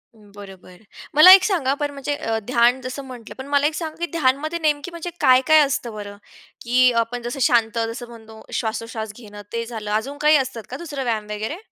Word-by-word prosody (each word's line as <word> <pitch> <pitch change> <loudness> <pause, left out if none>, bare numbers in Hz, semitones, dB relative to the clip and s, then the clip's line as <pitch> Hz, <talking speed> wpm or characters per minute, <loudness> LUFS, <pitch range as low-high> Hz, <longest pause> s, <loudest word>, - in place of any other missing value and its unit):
बरोबर. 200 -3 -14 0.4
मला 360 +5 +10
एक 385 0 +7
सांगा, 310 -10 +1
पण 290 -1 -2
म्हणजे 280 +1 -4
अ, 225 -6 -2
ध्यान 245 +1 +3
जसं 260 +2 -6
म्हटलं 245 -3 -11
पण 265 +1 -8
मला 285 0 +2
एक 310 - -3
सांगा, 315 -2 -5
की 345 - -1
ध्यानमध्ये 310 +2 0
नेमकी 305 +1 -1
म्हणजे 340 +1 -6
काय-काय 265 +5 +5
असतं 245 -4 -3
बरं? 205 -1 -8 0.4
की 250 +1 +3
आपण 240 +1 -5
जसं 240 +3 -5
शांत 230 -4 +2 0.2
जसं 240 0 -8
म्हणतो 220 -1 -13
श्वासोश्वास 220 -1 -4
घेणं 205 -3 -11
ते 230 0 -2
झालं. 220 -3 -6
अजून 265 +7 -2
काही 300 +1 +5
असतात 255 -4 -4
का 260 - -5
दुसरं 290 -5 -6
व्यायाम 220 -3 -2
वगैरे? 220 +10 -4
250 Hz, 195 wpm, -21 LUFS, 225-290 Hz, 0.4 s, मला